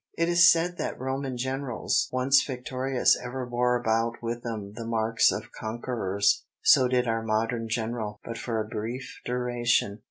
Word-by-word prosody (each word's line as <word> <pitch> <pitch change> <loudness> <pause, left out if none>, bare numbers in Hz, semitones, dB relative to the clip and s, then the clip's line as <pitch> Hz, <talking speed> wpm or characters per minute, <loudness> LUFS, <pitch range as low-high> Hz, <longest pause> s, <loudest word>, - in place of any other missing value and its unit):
It 165 +1 +1
is 170 0 +7
said 175 +1 0
that - - -3
Roman 130 0 -3
generals, 130 -1 -1
once 135 +2 +4
victorious 130 0 +1
ever 125 +1 -4
bore 125 0 +1
about 115 0 +1
with 120 0 -4
them 105 -4 -5
the 115 - -7
marks 115 -1 +2
of - - -5
conquerors; 110 -3 -1 0.2
so 130 - +6
did 125 -1 +1
our 115 0 0
modern 115 +1 -1
general, 110 -2 -3
but 115 - -6
for 115 -2 -2
a 110 - -1
brief 115 +4 -6
duration. 120 -4 0
120 Hz, 160 wpm, -27 LUFS, 115-130 Hz, 0.2 s, is